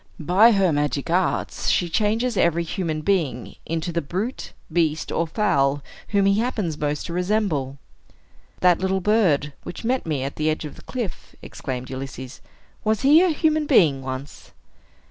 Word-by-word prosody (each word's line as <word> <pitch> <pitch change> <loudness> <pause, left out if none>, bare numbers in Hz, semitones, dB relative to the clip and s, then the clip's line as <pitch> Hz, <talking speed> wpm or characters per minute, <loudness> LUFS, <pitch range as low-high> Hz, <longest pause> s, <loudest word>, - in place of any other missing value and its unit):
By 190 +9 +5
her 190 -5 +3
magic 145 +1 -1
arts 180 +1 0
she 175 - +2
changes 220 +7 0
every 170 -2 +2
human 165 -2 -3
being 155 -10 -1
into 165 +1 -2
the 170 0 -1
brute, 195 - -4 0.2
beast, 160 -2 0
or 170 - 0
fowl 145 -7 +1 0.2
whom 200 -1 +2
he 200 +1 +3
happens 215 -9 -1
most 150 0 -2
to 170 - -6
resemble." 180 -8 -1 0.8
"That 180 -2 +4
little 190 0 0
bird, 175 -9 +2
which 200 - -8
met 255 -4 0
me 145 -4 -1
at 140 - -5
the 155 0 +1
edge 155 0 -2
of 150 - -7
the - - -14
cliff," 235 -9 -6
exclaimed 130 -1 -6
Ulysses; 130 -1 -7 0.4
"was 215 -1 +1
he 295 +5 +6
a 370 - +4
human 310 -1 +1
being 160 - +4
once?" 130 +2 -7
170 Hz, 165 wpm, -23 LUFS, 145-210 Hz, 0.8 s, he